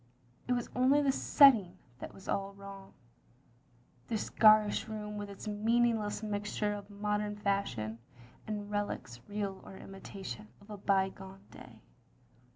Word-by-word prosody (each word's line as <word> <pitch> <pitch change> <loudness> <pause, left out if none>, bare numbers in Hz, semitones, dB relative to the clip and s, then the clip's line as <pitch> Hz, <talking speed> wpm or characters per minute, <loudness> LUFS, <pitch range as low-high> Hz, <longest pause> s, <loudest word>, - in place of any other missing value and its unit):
It 250 - +2
was 245 -1 -1
only 270 +4 +4
the 275 - +4
setting 230 - +5 0.2
that - - -7
was 195 - -14
all 195 0 -2
wrong. 200 -1 -11 1.1
This 220 - -3
garish 215 -1 +5
room 210 -1 -5
with 205 -1 -5
its 200 +2 -9
meaningless 220 0 +1
mixture 210 0 -1
of 205 0 -8
modem 210 0 -2
fashion, 195 - -2 0.5
and 210 -1 -4
relics, 205 - -3
real 200 -2 -3
or 190 - -11
imitation, 195 +2 -8
of 205 +1 -15
a 210 - -6
by 195 -1 +2
gone 190 0 -12
day. 125 -3 -13
205 Hz, 140 wpm, -32 LUFS, 195-215 Hz, 1.1 s, setting